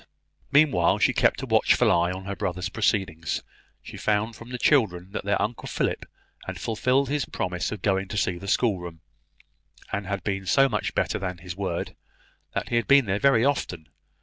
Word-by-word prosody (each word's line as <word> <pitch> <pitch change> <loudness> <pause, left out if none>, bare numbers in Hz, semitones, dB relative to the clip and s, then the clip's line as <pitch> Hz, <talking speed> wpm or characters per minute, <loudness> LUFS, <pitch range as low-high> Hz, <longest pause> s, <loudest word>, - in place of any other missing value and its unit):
Meanwhile 145 0 +4
she - - +3
kept - - +2
a - - -1
watchful - - +3
eye 85 +1 +2
on 95 +1 -6
her 100 0 -4
brother's 90 -1 -3
proceedings. 95 -8 -1 0.4
She - - -9
found 110 +2 0
from 115 +2 -12
the 125 - -4
children 95 - +2
that 105 - -5
their 100 - +1
Uncle 115 +2 -3
Philip - - -2 0.4
had - - -5
fulfilled 130 +5 +1
his 145 +1 -1
promise 90 -1 -3
of 105 -4 -6
going 95 -1 +1
to 105 - -5
see 90 -3 0
the 100 - -9
schoolroom, 90 -7 0 0.9
and 100 -1 -2
had 100 -2 -3
been 95 -2 -3
so 135 +8 +5
much 105 -6 -2
better - - 0
than 90 -2 -4
his 90 0 -8
word, 95 -3 -3 0.6
that - - -2
he 120 - +1
had 120 - 0
been 140 -2 +6
there 100 0 -1
very 135 -3 +4
often. 130 - -2
100 Hz, 190 wpm, -25 LUFS, 90-120 Hz, 0.9 s, been